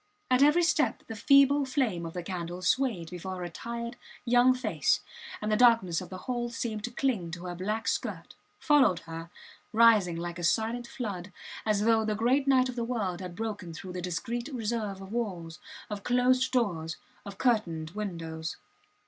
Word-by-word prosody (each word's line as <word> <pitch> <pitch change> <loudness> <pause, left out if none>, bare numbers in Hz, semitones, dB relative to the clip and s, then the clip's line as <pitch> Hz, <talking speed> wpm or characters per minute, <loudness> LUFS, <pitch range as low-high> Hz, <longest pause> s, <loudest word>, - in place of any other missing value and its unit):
At 255 +1 +5
every 300 +5 +5
step 320 -2 +1
the 225 - -7
feeble 275 +5 +5
flame 250 - -1
of 165 - -8
the 180 - -3
candle 175 0 -5
swayed 195 -6 +1
before 185 +1 -5
her 180 -1 -5
tired, 235 +6 -6 0.3
young 245 +1 +5
face, 255 - +1 0.4
and 215 0 -2
the - - +4
darkness 220 -8 +4
of 180 - -8
the 185 - -7
hall 240 -2 -2
seemed 225 -2 -4
to - - -4
cling 240 -8 -1
to 175 +1 -7
her 180 - -4
black 210 +5 -3
skirt, - - -2 0.2
followed 280 - +4
her, 165 0 -8 0.4
rising 220 -6 +5
like 175 +1 -5
a - - -5
silent 230 +6 +1
flood, 205 -7 -5 0.4
as 210 -1 +2
though 225 0 +4
the 215 -1 -1
great 255 +6 +2
night 260 -2 +5
of 250 - -5
the 235 - -2
world 205 -7 -2
had 180 -2 -7
broken 205 -6 -5
through 180 +2 -8
the 180 - -4
discreet 235 - -3
reserve 220 -5 -3
of 195 +1 -10
walls, 180 -9 -4 0.3
of 205 -1 -5
closed 255 +3 +2
doors, 170 -10 0 0.3
of 200 -1 -9
curtained 170 -11 0
windows. 165 -6 -5
215 Hz, 180 wpm, -29 LUFS, 180-245 Hz, 0.4 s, At